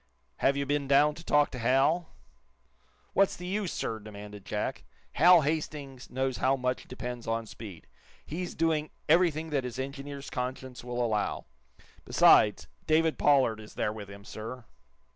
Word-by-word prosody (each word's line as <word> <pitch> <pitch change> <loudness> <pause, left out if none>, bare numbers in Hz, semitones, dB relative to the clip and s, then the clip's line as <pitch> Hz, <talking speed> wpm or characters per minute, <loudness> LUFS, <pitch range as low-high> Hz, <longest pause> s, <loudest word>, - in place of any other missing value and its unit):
"Have 140 +1 +2
you 140 - 0
been 145 0 -1
down 145 +2 +5
to 165 - -11
talk 145 -3 +3
to 125 - -6
Hal?" 135 +8 +2 1.0
"What's 195 -1 +3
the 180 - -8
use, 195 0 -2
sir?" 110 - -3
demanded 105 -1 -10
Jack. - - -3 0.3
"Hal 175 +4 +7
Hastings 145 -3 -3
knows 130 -1 -1
how 130 +3 +2
much 125 -1 -2
depends 125 -1 -6
on 115 0 -1
speed. 105 -6 -10 0.4
He's 175 +3 -5
doing 155 -2 +1 0.2
everything 160 -1 +3
that 140 -3 0
his 125 -1 -5
engineer's 140 +1 -6
conscience 125 0 -5
will 120 0 -1
allow. 105 -2 -1 0.6
Besides, - - +5 0.2
David 160 0 +2
Pollard 130 -6 +4
is 110 0 -12
there 105 - -1
with 105 -2 -8
him, 100 0 -11
sir." 115 +3 -7
135 Hz, 155 wpm, -29 LUFS, 120-155 Hz, 1.0 s, Hal